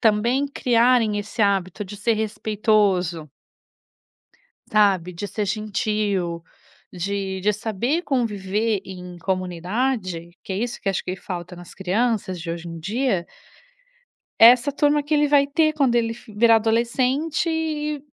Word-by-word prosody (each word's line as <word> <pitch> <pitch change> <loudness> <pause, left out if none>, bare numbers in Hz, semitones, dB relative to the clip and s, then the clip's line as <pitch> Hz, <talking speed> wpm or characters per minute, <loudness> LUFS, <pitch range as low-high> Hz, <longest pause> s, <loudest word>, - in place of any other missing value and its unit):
também 235 +6 +2
criarem 240 -5 +2
esse 210 +3 -6
hábito 200 0 0
de 205 +2 -9
ser 225 +2 +1
respeitoso" 205 -6 0 1.4
sabe? 190 -4 +3
"De 200 +4 -5
ser 210 0 -3
gentil, 210 -1 -1 0.7
de 190 +1 -3
de 210 +2 +3
saber 230 - -1
conviver 215 -4 -1
em 180 -2 -9
comunidade, 185 0 -2
que 190 - -5
é - - -2
isso 240 +2 -3
que 195 - 0
acho 195 - -2
que 185 - -4
falta 180 -2 -7
nas 175 0 -12
crianças 195 -1 -1
de 165 +1 -6
hoje 170 0 -6
em 165 -1 -7
dia" 200 0 -1 1.1
essa 245 +4 +7
turma 295 0 +2
que 300 +2 -2
ele 295 0 +3
vai 280 -1 +4
ter 310 +2 +2
quando 270 -5 +2
ele 230 -1 +1
fo 230 -2 -14
virar 230 +1 +6
adolescente, 255 +8 0
eh 300 -2 -2
215 Hz, 140 wpm, -23 LUFS, 190-245 Hz, 1.4 s, essa